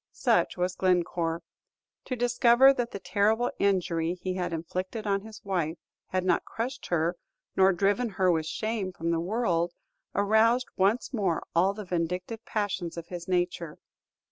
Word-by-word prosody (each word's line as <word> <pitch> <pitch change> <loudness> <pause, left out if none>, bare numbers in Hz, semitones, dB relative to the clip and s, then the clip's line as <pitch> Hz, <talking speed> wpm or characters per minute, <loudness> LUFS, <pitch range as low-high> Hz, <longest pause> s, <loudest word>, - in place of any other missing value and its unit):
Such - - +2
was 180 0 0
Glencore. 170 -2 0 0.6
To 255 - -2
discover 245 +2 +5
that 245 -3 -2
the - - -6
terrible 205 +6 +1
injury 175 -4 +1
he 185 +1 -4
had 180 -1 -2
inflicted 185 +6 -4
on 200 -1 +1
his 220 +1 -12
wife 170 -4 -1 0.3
had 185 -1 -1
not 185 - +2
crushed 250 +3 -5
her 170 +1 0 0.4
nor 190 0 +5
driven 200 +6 +1
her 185 -2 +2
with 160 -2 0
shame 215 +1 -2
from 170 -1 -2
the 165 - +1
world, 175 -3 0 0.4
aroused 220 +5 +3
once 205 +8 +1
more 195 -8 0
all 190 +4 +3
the 210 -1 -6
vindictive 180 +5 -3
passions 190 -5 -2
of 170 0 -7
his 175 -2 -6
nature. 175 -3 -1
185 Hz, 155 wpm, -28 LUFS, 175-220 Hz, 0.6 s, discover